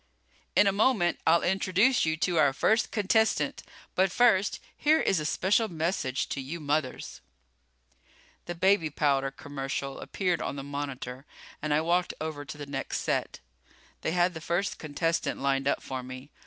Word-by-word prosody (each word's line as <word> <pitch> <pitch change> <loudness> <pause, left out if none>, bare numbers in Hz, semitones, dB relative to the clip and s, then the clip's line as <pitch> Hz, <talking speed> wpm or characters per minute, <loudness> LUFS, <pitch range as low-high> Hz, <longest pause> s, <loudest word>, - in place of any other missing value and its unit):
In - - +6
a 200 - +4
moment 200 -3 +2
I'll 165 +1 +5
introduce 195 +4 +2
you 160 0 0
to 170 +1 0
our 140 -3 +4
first 220 +10 +2
contestant. 220 +1 +1 0.3
But 190 0 +2
first 205 -5 +3 0.2
here 310 +2 +3
is 190 - +2
a 150 - -2
special 205 +7 +2
message 160 -6 -1
to 135 - -3
you 150 +6 -6
mothers 145 -3 -2 0.6
..." 65 +2 -33
The 175 - -4
baby 185 -2 +3
powder 140 -2 +1
commercial 135 -1 -5
appeared 180 -3 -1
on - - -3
the 135 - -5
monitor 140 -2 -6 0.3
and 155 0 -2
I 150 +1 +3
walked 175 +2 +1
over 155 -2 -4
to 145 - -8
the 145 - -6
next 135 -1 -3
set. - - -2 0.6
They 160 - -1
had 180 0 +2
the 160 - -7
first 175 +5 -1
contestant 165 +2 -1
lined 135 0 0
up - - 0
for 130 -1 -4
me. 130 +2 -9
160 Hz, 170 wpm, -28 LUFS, 140-185 Hz, 0.6 s, In